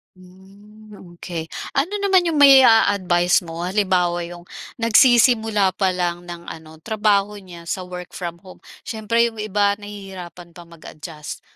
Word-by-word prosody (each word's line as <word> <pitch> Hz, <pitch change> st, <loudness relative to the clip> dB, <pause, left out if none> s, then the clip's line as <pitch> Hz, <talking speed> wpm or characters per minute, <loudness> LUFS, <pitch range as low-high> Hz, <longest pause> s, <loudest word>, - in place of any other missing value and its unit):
Hmm, 200 Hz, +4 st, -18 dB, 0.2 s
okey 165 Hz, -2 st, -6 dB, 0.2 s
ano 290 Hz, +9 st, -1 dB
naman 390 Hz, -2 st, +3 dB
yung 315 Hz, -, -2 dB
mai-aadvice 205 Hz, -10 st, +5 dB
mo 165 Hz, +1 st, -5 dB
halimbawa 180 Hz, -3 st, 0 dB
yung 175 Hz, 0 st, -9 dB, 0.3 s
nagsisimula 225 Hz, -4 st, +3 dB
pa 190 Hz, 0 st, 0 dB
lang 175 Hz, -1 st, -2 dB
ng 170 Hz, 0 st, -9 dB
ano 160 Hz, -1 st, -11 dB
trabaho 210 Hz, -2 st, +1 dB
niya 175 Hz, -3 st, -13 dB
sa 185 Hz, -, -4 dB
work 180 Hz, -1 st, -9 dB
from 170 Hz, -1 st, -6 dB
home, 185 Hz, -, -14 dB, 0.2 s
siyempre 230 Hz, +1 st, 0 dB
yung 225 Hz, -2 st, -5 dB
iba 205 Hz, -1 st, +1 dB
nahihirapan 195 Hz, -4 st, -10 dB
pa 170 Hz, 0 st, -14 dB
mag-adjust. 155 Hz, -1 st, -10 dB
190 Hz, 135 wpm, -20 LUFS, 175-215 Hz, 0.3 s, mai-aadvice